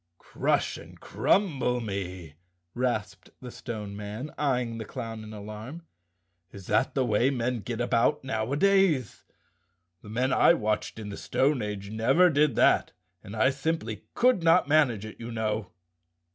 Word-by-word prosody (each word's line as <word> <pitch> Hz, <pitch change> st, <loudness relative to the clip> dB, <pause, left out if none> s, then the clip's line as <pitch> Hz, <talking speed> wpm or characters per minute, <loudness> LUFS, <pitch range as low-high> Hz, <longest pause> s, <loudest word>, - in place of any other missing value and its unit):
"Crush -, -, -1 dB
and -, -, -13 dB
crumble 140 Hz, -11 st, +1 dB
me!" 95 Hz, -7 st, -5 dB, 0.4 s
rasped 105 Hz, -6 st, -2 dB
the 125 Hz, -1 st, -9 dB
Stone 105 Hz, -5 st, -6 dB
Man, 105 Hz, +8 st, -6 dB
eying 125 Hz, -5 st, 0 dB
the -, -, -4 dB
clown 115 Hz, -1 st, -6 dB
in 110 Hz, -, -10 dB
alarm, 110 Hz, +9 st, -8 dB, 0.7 s
"is 100 Hz, -2 st, -11 dB
that 135 Hz, -, +1 dB
the 135 Hz, -2 st, +2 dB
way 120 Hz, +3 st, +2 dB
men 125 Hz, -2 st, -1 dB
get 115 Hz, +2 st, -5 dB
about 120 Hz, +4 st, +1 dB
nowdays? 140 Hz, -, +1 dB, 0.8 s
The 105 Hz, -, -12 dB
men 125 Hz, +4 st, 0 dB
I 170 Hz, -, +5 dB
watched 105 Hz, -2 st, -2 dB
in 105 Hz, -2 st, -6 dB
the 100 Hz, -, -7 dB
stone 135 Hz, -1 st, +1 dB
age 105 Hz, -1 st, -5 dB
never 135 Hz, +12 st, +4 dB
did 150 Hz, 0 st, +2 dB
that -, -, +3 dB, 0.3 s
and 100 Hz, -, -9 dB
I 130 Hz, +5 st, +3 dB
simply 160 Hz, +5 st, -3 dB
could 250 Hz, -6 st, +3 dB
not 165 Hz, -3 st, +4 dB
manage 140 Hz, -9 st, +3 dB
it, 110 Hz, -, -10 dB
you 115 Hz, +1 st, -7 dB
know." 110 Hz, -3 st, -2 dB
120 Hz, 150 wpm, -27 LUFS, 105-140 Hz, 0.8 s, I